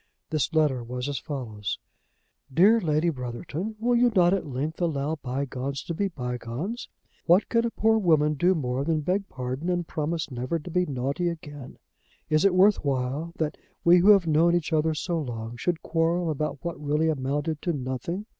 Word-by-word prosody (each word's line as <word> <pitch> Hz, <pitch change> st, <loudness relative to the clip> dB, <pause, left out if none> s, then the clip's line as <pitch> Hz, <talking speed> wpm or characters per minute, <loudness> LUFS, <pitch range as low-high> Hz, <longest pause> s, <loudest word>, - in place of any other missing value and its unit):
This 155 Hz, -1 st, 0 dB
letter 150 Hz, -6 st, +2 dB
was 125 Hz, +2 st, -4 dB
as 140 Hz, -3 st, -2 dB
follows; 110 Hz, -, -4 dB, 0.7 s
"DEAR 205 Hz, -, +5 dB
LADY 155 Hz, 0 st, +1 dB
BROTHERTON, 145 Hz, -, -5 dB
Will 240 Hz, +2 st, +1 dB
you 240 Hz, 0 st, +4 dB
not 180 Hz, -1 st, +5 dB
at 195 Hz, -5 st, -1 dB
length 145 Hz, +6 st, -3 dB
allow 155 Hz, -2 st, 0 dB
bygones 135 Hz, 0 st, -4 dB
to 170 Hz, -, -4 dB
be 200 Hz, +5 st, 0 dB
bygones? 125 Hz, -, -5 dB, 0.4 s
What 175 Hz, +4 st, +5 dB
can 230 Hz, 0 st, +2 dB
a -, -, -1 dB
poor 220 Hz, -1 st, +2 dB
woman 155 Hz, -6 st, +3 dB
do 175 Hz, +6 st, +2 dB
more 130 Hz, -3 st, -1 dB
than 155 Hz, 0 st, 0 dB
beg 190 Hz, +6 st, -1 dB
pardon 130 Hz, +6 st, -4 dB
and 175 Hz, -1 st, 0 dB
promise 155 Hz, 0 st, -2 dB
never 130 Hz, +6 st, -2 dB
to 165 Hz, +2 st, -8 dB
be 180 Hz, +1 st, +1 dB
naughty 140 Hz, +6 st, -1 dB
again. 145 Hz, -5 st, -8 dB, 0.5 s
Is 155 Hz, 0 st, +4 dB
it 195 Hz, -2 st, +4 dB
worth 195 Hz, +3 st, +5 dB
while 140 Hz, +4 st, -1 dB
that 155 Hz, -1 st, -2 dB, 0.3 s
we 175 Hz, +1 st, +7 dB
who 190 Hz, +4 st, +5 dB
have 200 Hz, -4 st, +7 dB
known 165 Hz, +2 st, +4 dB
each 165 Hz, -1 st, -1 dB
other 155 Hz, 0 st, +2 dB
so 170 Hz, +2 st, -1 dB
long 115 Hz, -3 st, -5 dB
should 165 Hz, +7 st, -2 dB
quarrel 165 Hz, +1 st, +1 dB
about 150 Hz, 0 st, -2 dB
what 170 Hz, -3 st, -4 dB
really 150 Hz, +2 st, +1 dB
amounted 145 Hz, +1 st, -1 dB
to 175 Hz, -, 0 dB
nothing? 140 Hz, -, -4 dB
155 Hz, 185 wpm, -26 LUFS, 135-175 Hz, 0.7 s, we